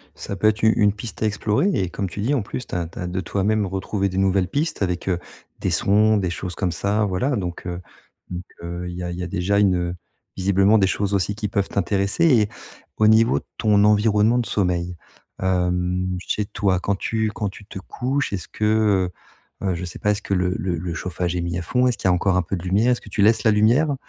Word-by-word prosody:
Ça 100 - -6
peut 110 - +2
être 110 0 +1
une 110 0 +6
une 100 -1 +3
piste 105 -1 -8
à - - +3
explorer 105 - +1
et 95 - 0
comme 95 +1 -3
tu 100 - -6
dis, 125 +7 +1
en 135 - +1
plus 125 +5 -6
tu - - -5
as 85 -2 -1
tu - - -11
as 90 - -3
de 90 +1 -3
toi-même 105 +2 0
retrouvé 95 +1 -2
des 95 - -5
nouvelles 95 -1 +2
pistes 145 - -2
avec, 90 -2 -1
heu, 90 -2 0 0.4
des - - -1
sons, 105 +2 +3
des 95 -3 0
choses 90 +1 -5
comme 95 -3 -1
ça, 105 +4 0
voilà. 100 +8 0
Donc 90 -5 -4
heu, 90 0 -4 0.5
donc 90 0 -5 0.2
heu, 85 +1 -5
il 90 - -7
y 90 - -4
a 90 - -3
il 85 - -6
y - - -3
a - - -3
déjà 100 +2 0
une, 100 -3 +4
heu, 90 0 -2 0.4
visiblement 100 +3 +4
des 95 -3 +3
choses 100 0 -1
aussi 100 +1 0
qui 105 -1 -3
peuvent 100 0 -1
t'intéresser 100 - +1
et 115 -10 +4 0.5
au 110 - +4
niveau 110 +2 +5
de - - -20
ton 105 -2 +3
environnement 105 +2 +4
de 120 - -1
sommeil: 90 -3 -1 0.4
hem, 90 0 0
chez, 105 +3 -2
toi 100 -3 0
quand 100 +2 0
tu 110 +1 -1
quand 105 -2 -2
tu 100 +2 -13
te 95 - -8
couches, 130 +6 -2
est-ce 90 -5 -4
que, 105 -4 +1 0.5
heu, - - 0
heu, 95 - +1
je 90 +2 -4
sais 90 - -8
pas, 105 - +2
est-ce 105 0 -2
que 100 - -3
le 90 0 +1
le 90 -2 -2
le 85 0 -4
chauffage 90 0 -3
est 90 - -1
mis 85 0 -2
à - - -2
fond, 125 +8 +2
est-ce 125 - 0
qu'il - - -1
y - - +5
a - - +4
encore 90 +1 +2
un - - +3
peu 95 - -3
de 85 - -6
lumière, 100 +7 +2
est-ce 125 - 0
que - - -13
tu 105 - -1
laisses 110 +1 +4
la 110 - +5
lumière? 120 +8 +3
100 Hz, 255 wpm, -22 LUFS, 90-105 Hz, 0.5 s, une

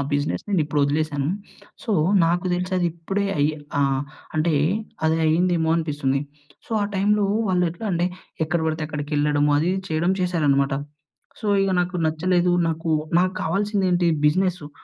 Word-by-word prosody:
బిజినెస్‌ని 145 +8 -1
ఇప్పుడు 150 0 -1
వదిలేసాను. 145 -1 -1 0.5
సో, 225 - -2 0.3
నాకు 175 +2 +1
తెలిసి 180 +1 -3
అది 175 -1 +1
ఇప్పుడే 195 +4 -3
అయ్ 145 - +4 0.3
ఆహ్, 135 -1 +2 0.4
అంటే 155 0 +2 0.5
అది 160 0 +3
అయిందేమో 165 0 +2
అనిపిస్తుంది. 145 -4 -1 0.5
సో, - - -23
ఆ - - +1
టైమ్‌లో 205 +1 +2 0.2
వాళ్ళు 180 -1 +2
ఎట్లా 195 +6 -7
అంటే, 175 +1 +1 0.4
ఎక్కడ 170 +2 0
పడితే 160 0 -2
అక్కడికేళ్ళడము 150 -1 0
అది, 165 +4 +1
ఇది 190 - -4
చేయడం 165 +4 +1
చేసారనమాట. 145 -6 +1 0.7
సో, 215 - -5 0.2
ఇగ 195 - +1
నాకు 180 +1 -2
నచ్చలేదు. 175 +3 +1 0.2
నాకు, 165 0 -2 0.3
నాకు 185 +1 +1
కావాల్సింది 200 +3 0
ఏంటి 175 -1 +2 0.2
బిజినెస్సు. 180 -1 +1
165 Hz, 145 wpm, -23 LUFS, 150-180 Hz, 0.7 s, అయ్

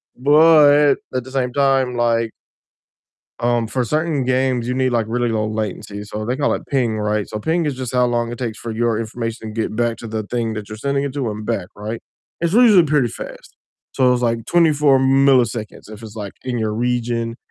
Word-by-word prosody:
But 145 +1 +5 0.2
at 130 - -1
the 130 - -12
same 130 -2 -1
time, 135 -2 +2
like 115 -1 +1 1.1
um, 120 -1 +1
for 125 +2 -1
certain 150 +1 -1
games 130 -1 0
you 125 - -1
need, 130 0 +1
like, 115 -3 0
really 120 +1 0
low 110 -2 -1
latency, 105 -1 -4
so 105 +1 -6
they 125 - 0
can, 145 +1 -1
like, - - -1
ping, 120 -6 0
right? 105 -1 -1
So, 110 - -5
ping 165 +7 0
is 145 -3 -2
just 130 -1 -5
how 125 0 +3
long 120 -1 -1
it 120 - -7
takes 115 -4 -4
for 115 - -6
your 115 0 0
information 115 -1 -5
to 115 - -2
get 110 - -3
back 120 -1 0
to 115 - -8
the 110 -1 -3
thing 115 0 -2
that 105 -2 -6
you're 110 - -7
sending 140 +4 -1
it 140 - -3
to 135 -6 -2
and 105 0 -7
back, 90 -2 -2
right? 110 +3 -5 0.4
It's 170 0 0
usually 220 -5 +6
pretty 150 -5 +2
fast. - - -10 0.4
So, 125 -1 +3
it's, 125 0 -1
like, 115 -1 0
24 150 -5 +4
milliseconds 130 -6 +2
if 110 +1 -11
it's, 110 -1 -10
like, 100 -2 -6
in 125 -2 -3
your 110 -1 -1
region, 120 -1 -1
120 Hz, 215 wpm, -19 LUFS, 110-135 Hz, 1.1 s, usually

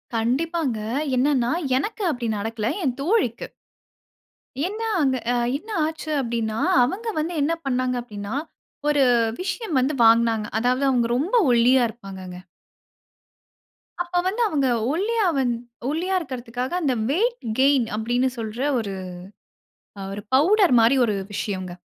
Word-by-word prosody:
கண்டிப்பாங்க. 260 +2 0 0.4
என்னன்னா 255 -2 +2 0.3
எனக்கு 415 - -3
அப்படி 245 -4 -3
நடக்கல, 225 +1 -2
என் 260 -4 -1
தோழிக்கு. 330 - 0 1.2
ஏன்னா 445 +3 -4
அங்க 265 -2 +2
ஆ - - +2 0.2
என்ன 430 - -16 0.2
ஆச்சு 315 0 -5
அப்படினா, 230 -2 -2 0.3
அவங்க 390 - -2
வந்து 325 +3 -2
என்ன 310 +4 +1
பண்ணாங்க 255 -1 0
அப்படினா, 205 -3 -7 0.6
ஒரு 290 -2 +3 0.4
விஷயம் 380 - -2
வந்து 270 +4 +1
வாங்னாங்க. 225 -1 +4
அதாவது 250 +3 +1
அவங்க 240 -3 +2
ரொம்ப 355 - 0 0.2
ஒல்லியா 245 +2 +5
இருப்பாங்கங்க. 190 -5 -9 1.6
அப்ப 350 0 -5
வந்து 425 +6 -1
அவங்க 285 -8 +1 0.3
ஒல்லியா 430 +5 0
வந் 250 -3 +1 0.4
ஒல்லியா 355 +6 -1
இருக்கிறதுகாக 250 -4 -5
அந்த 275 -5 +1 0.2
வெயிட் 470 - +1 0.2
கெய்ன் 270 -4 +4
அப்படினு 245 +4 0
சொல்ற 225 +1 -5 0.2
ஒரு 200 -3 -4 1.1
அ - - -6
ஒரு 205 - -6
பவுடர் 355 - +5
மாரி 230 +4 +5
ஒரு 215 - 0 0.2
விஷயங்க. 185 -3 -3
255 Hz, 125 wpm, -23 LUFS, 230-325 Hz, 1.6 s, ஒல்லியா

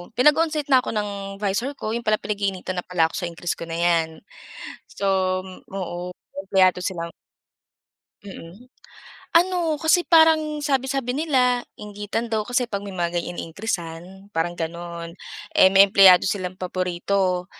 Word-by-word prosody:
pinag-onsite 300 +3 +2
na 260 - +7
ako - - -4
ng 210 -1 -1 0.3
'visor 215 +8 -1
ko, 215 - -3
'yon 235 - -4
pala 215 0 +1
pinag-iinitan 195 -3 -3
na - - -28
pala 165 -3 +2
ako - - -18
sa 175 - -3
increase 170 +1 -4
ko 170 - -6
na 165 - -5
'yan. 170 -2 +2 0.8
So, 200 - -4 0.6
oo 180 -2 -5 0.2
empleyado 190 -1 +3
silang 170 -3 -3 1.2
Mm. 195 +4 -11 0.7
Ano 345 -3 +1
kasi 320 +3 +3
parang 315 -2 +4
sabi-sabi 265 -2 0
nila 255 -6 +2 0.2
inggitan 210 +2 -4
daw 220 - +1
kasi 245 0 0
'pag 200 -4 -4
ganyan 195 -2 -8
na 175 -1 +1
may 175 -1 -1
iniin-creasan 175 +1 -6
parang 165 +2 -1
gano'n. 170 0 -6 0.4
Eh 190 - +6
may 195 +1 +7
empleyado 190 -2 +7
silang 185 -2 -2
paborito. 185 0 -1
195 Hz, 145 wpm, -23 LUFS, 175-250 Hz, 1.2 s, na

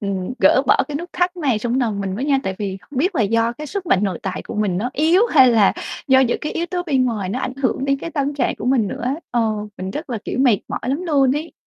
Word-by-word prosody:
ừm, 195 +1 -3
gỡ - - +5
bỏ - - +5
cái 290 - -3
nút 345 +4 -6
thắt 360 0 0
này 275 -10 0
trong 240 +4 -1
nòng 220 -5 -1
mình 195 -1 -3
với 240 +7 -3
nha. 280 -2 +2
Tại 190 - -3
vì 195 -2 -3
không 250 +9 -8
biết 360 +9 +1
là 235 - +2
do 230 +3 +1
cái 300 +5 -8
sức 380 +3 -5
mạnh 190 - +3
nội 190 -4 -2
tại 190 -1 -4
của - - -8
mình 205 -4 0
nó 245 +5 -2
yếu 325 +7 +3
hay 265 - +6
là 220 -4 +4 0.4
do 265 -1 +6
những 255 -3 +1
cái 300 - -4
yếu 340 - -2
tố 355 0 -3
bên 275 -7 +1
ngoài 215 -6 -2
nó 205 - -2
ảnh 255 0 -3
hưởng 260 +1 0
đến 275 0 +1
cái 335 +4 -6
tâm 285 -2 -1
trạng 270 -4 0
của - - -7
mình 250 -5 +2
nữa - - -6
á, 255 +2 0 0.2
ờ, 240 - +1 0.4
mình 185 +1 -4
rất 295 - -6
là, 230 - -2
kiểu, - - -4
mệt 245 -7 +4
mỏi - - -4
lắm 275 +7 -2
luôn 280 -7 +2
ấy. 315 +3 -5
255 Hz, 295 wpm, -20 LUFS, 210-295 Hz, 0.4 s, hay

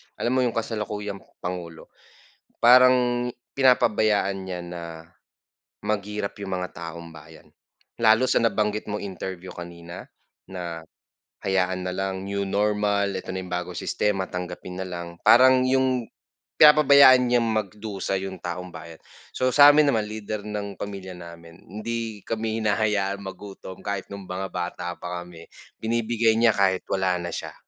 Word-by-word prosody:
lam 120 - -1
mo 130 - +2
iyong 125 -2 0
kasalukuyang 105 -3 -4 0.2
Pangulo, 90 -2 -6 0.7
parang 125 0 +5 0.2
pinapabayaan 110 -6 +3
niya 95 -2 -5
na 85 0 -7 1.0
maghirap 105 -1 -2
yung 95 -2 -3
mga 90 0 -5
taumbayan. 85 -2 -11 0.5
Lalo 110 +2 +5
na - - +1
sa - - +3
nabanggit 105 -2 0
mong 105 0 -3
interview 95 -1 -6
kanina 85 0 -9 0.4
na 85 -3 -6 0.7
hayaan 95 -1 0
na 90 - -3
lang 95 0 -3
new 100 0 -2
normal, 100 0 0
eto 95 - -5
na 95 - -3
yung 90 -1 -7
bagong 90 0 -3
sistema, 95 -3 -1
tanggapin 90 +1 -6
na - - -5
lang. 85 -1 -6
Parang 130 +1 +6
yung 130 -2 +1 0.5
pinapabayaan 140 -4 +8
niyang 120 -1 +3
magdusa 100 -2 -3
yung 95 0 -5
taumbayan. 85 -2 -7 0.3
So, 130 0 0
sa 145 0 +9
amin 150 0 +5
naman, 105 -1 -1
leader 110 -1 -5
ng 105 -1 -5
pamilya 95 -2 -7
namin, 85 -1 -12
hindi 110 +2 -5
kami 110 0 -2
hinahayaan 105 -2 0
magutom 95 -1 -9
kahit 100 -1 -5
noong 100 -1 -8
mga 95 +1 -4
bata 90 0 -4
pa 90 0 -5
kami, 85 -1 -13 0.3
binibigay 115 0 +1
niya 115 +1 +4
kahit 100 -3 +2
wala 95 -1 +1
na 85 - -4
siya. - - -6
100 Hz, 140 wpm, -24 LUFS, 90-110 Hz, 1.0 s, sa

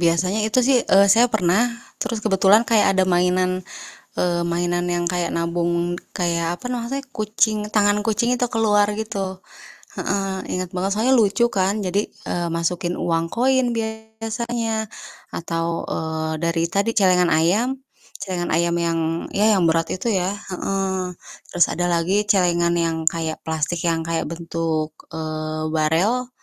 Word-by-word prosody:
biasanya 180 +4 +2
itu 235 - +1
sih, 260 -2 +4
eee, 195 -2 +5
saya 235 +3 +5
pernah 190 -2 +2 0.4
terus 220 -3 -3
kebetulan 200 +2 +4
kayak 210 -4 +3
ada 190 - +4
mainan, 185 0 +1 0.5
eee, 175 -1 0
mainan 175 +1 0
yang 175 -1 -1
kayak 175 -1 -1
nabung, 170 +1 -1 0.2
kayak 170 -1 0
apa 250 - -5
namanya 250 +3 -3
kucing 215 -2 0
tangan 205 -1 +3
kucing 225 +2 +1
itu 245 - +1
keluar 210 -2 +3
gitu 195 -3 -4 0.6
heeh. 195 -1 -2
Inget 185 -1 -3
banget 190 +2 -1
soalnya 230 +5 +2
lucu 220 +3 +2
kan 195 +2 0
jadi, 195 +3 0 0.2
eee, 175 -1 -1
masukin 170 +1 -1
uang 165 -1 0
koin 250 +3 +1
biasanya 220 0 -3 0.5
atau, 165 0 -2
eee, 160 0 -3
dari 165 0 0
tadi 200 +3 +1
celengan 180 -3 +4
ayam 180 +11 +2 0.5
celengan 180 -4 -2
ayam 170 +1 +1
yang, 170 -1 0 0.4
ya 215 +2 +4
yang 180 - +2
berat 165 0 +1
itu 185 - -3
ya 185 0 0
heeh. 190 -2 -3 0.4
Terus 175 - +4
ada 175 - -1
lagi 175 +5 +1
celengan 175 -4 +2
yang 165 -1 0
kayak 160 0 -1
plastik 160 +1 -2
yang 165 -1 +1
kayak 165 -1 -2
bentuk, 165 -2 -3 0.2
eee, 155 0 -4
barel, 175 +11 +1
185 Hz, 145 wpm, -22 LUFS, 170-215 Hz, 0.6 s, eee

